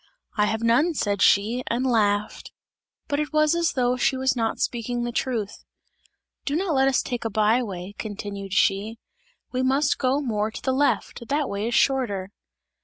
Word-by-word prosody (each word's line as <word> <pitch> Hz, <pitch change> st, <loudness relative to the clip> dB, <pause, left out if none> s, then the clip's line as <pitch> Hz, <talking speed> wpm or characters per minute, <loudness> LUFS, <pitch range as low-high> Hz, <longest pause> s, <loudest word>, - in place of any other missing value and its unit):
"I 210 Hz, -2 st, +3 dB
have 220 Hz, +1 st, -2 dB
none!" 275 Hz, +9 st, +3 dB
said 205 Hz, -6 st, -1 dB
she, 225 Hz, +5 st, +3 dB
and 245 Hz, +3 st, -1 dB
laughed; 210 Hz, -4 st, 0 dB, 0.6 s
but 285 Hz, -1 st, -1 dB
it 300 Hz, 0 st, -2 dB
was 305 Hz, 0 st, +3 dB
as 340 Hz, -1 st, +1 dB
though 250 Hz, -1 st, +1 dB
she 260 Hz, +1 st, +1 dB
was 260 Hz, 0 st, +1 dB
not 225 Hz, -2 st, -1 dB
speaking 240 Hz, 0 st, -2 dB
the 240 Hz, -, -2 dB
truth. 230 Hz, -4 st, -3 dB, 0.8 s
"Do 285 Hz, -, -2 dB
not 355 Hz, 0 st, 0 dB
let 270 Hz, -1 st, +3 dB
us 270 Hz, -, +2 dB
take 245 Hz, -1 st, -4 dB
a 225 Hz, -, -1 dB
by 215 Hz, +3 st, +2 dB
way," 190 Hz, -4 st, -6 dB
continued 200 Hz, -2 st, -6 dB
she, 205 Hz, +3 st, +1 dB, 0.5 s
"we 255 Hz, -, -1 dB
must 270 Hz, +3 st, +2 dB
go 265 Hz, +1 st, +1 dB
more 215 Hz, -6 st, -1 dB
to 220 Hz, -, -9 dB
the 260 Hz, -, +1 dB
left, 265 Hz, -3 st, 0 dB
that 290 Hz, 0 st, 0 dB
way 200 Hz, +2 st, -3 dB
is 235 Hz, -, -1 dB
shorter!" 205 Hz, -8 st, +1 dB
240 Hz, 180 wpm, -24 LUFS, 210-265 Hz, 0.8 s, I